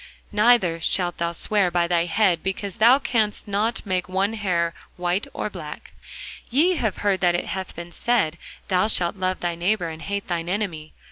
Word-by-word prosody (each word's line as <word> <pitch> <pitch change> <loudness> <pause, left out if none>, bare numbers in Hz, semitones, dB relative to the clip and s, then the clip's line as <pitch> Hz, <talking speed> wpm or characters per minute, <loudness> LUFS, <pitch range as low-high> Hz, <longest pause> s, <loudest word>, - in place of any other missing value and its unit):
Neither 210 -6 +3
shalt 175 +1 +1
thou 170 0 0
swear 195 +2 +1
by 175 0 +1
thy 170 -1 +2
head, 180 -2 +2
because 195 +2 -4
thou 235 +4 +7
canst 220 -7 0
not 210 +4 -1
make 185 -2 -1
one 195 +3 0
hair 175 -6 0 0.2
white 180 +3 -1
or - - -3
black. - - -8 0.6
Ye 325 +8 +3
have 220 -8 -1
heard 195 -2 +3
that 175 -1 +3
it 175 - -1
hath 190 -1 -5
been 170 +1 -8
said, 175 -7 0 0.3
Thou 185 +1 +2
shalt 175 -5 +1
love 185 -1 -2
thy 175 -1 -1
neighbour, 175 +1 0
and 160 0 -8
hate 200 0 -4
thine 170 -1 -2
enemy. 180 -6 -3
185 Hz, 185 wpm, -23 LUFS, 175-210 Hz, 0.6 s, thou